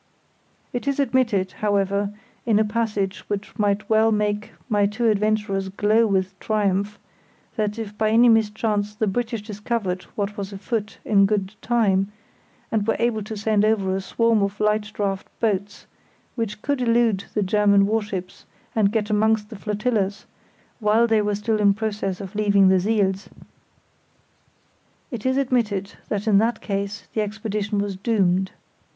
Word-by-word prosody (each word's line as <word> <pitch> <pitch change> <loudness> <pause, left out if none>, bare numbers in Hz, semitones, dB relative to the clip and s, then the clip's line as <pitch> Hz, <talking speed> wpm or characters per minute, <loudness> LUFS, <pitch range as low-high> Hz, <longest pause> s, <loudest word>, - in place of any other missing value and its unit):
It 245 +2 -4
is 280 0 0
admitted, 235 -8 +1
however, 200 -1 0 0.3
in 225 -3 +2
a 215 - +3
passage 210 -3 -1
which 205 0 -4
might 205 0 +1
well 220 0 +4
make 210 0 -1 0.2
my 205 -4 +2
two 230 +3 -1
adventurers 210 -2 0
glow 215 +4 +2
with 190 -1 -1
triumph, 205 -1 0 0.6
that 210 -2 -1
if 215 -2 -6
by 215 0 +1
any 230 +3 +5
mischance 210 -2 +1
the 220 - 0
British 230 +1 -2
discovered 210 -3 -3
what 205 +1 -3
was 200 0 -5
afoot 210 +2 -4
in 200 -2 +4
good 195 -1 -1
time, 205 -4 +1 0.6
and 215 -1 0
were 225 - +2
able 230 -2 0
to 215 +1 -6
send 210 0 +1
over 200 -3 +2
a 195 - -2
swarm 230 +2 +2
of 200 +1 -2
light 210 0 +1
draught 195 -2 -2
boats, 205 -2 -1 0.5
which 220 -3 -4
could 285 -2 0
elude 230 -4 +2
the 210 - +2
German 200 0 +4
warships 205 -4 -3 0.3
and 205 -3 +3
get 215 -1 -1
amongst 215 0 +2
the - - -7
flotillas 210 -1 -1 0.5
while 220 +1 +3
they 225 -2 +3
were 205 0 0
still 215 +1 -1
in 200 -1 +4
process 205 -3 -2
of 195 0 -7
leaving 200 -2 +4
the 190 0 +4
siels; 195 -1 0 1.8
it 240 -1 -3
is 260 +1 +1
admitted 225 -7 0 0.2
that 205 -1 -2
in 200 -2 +5
that 225 +1 +1
case 200 +1 -4
the 220 - 0
expedition 210 0 -3
was 200 -1 -1
doomed. 190 -3 +1
210 Hz, 155 wpm, -23 LUFS, 200-220 Hz, 1.8 s, any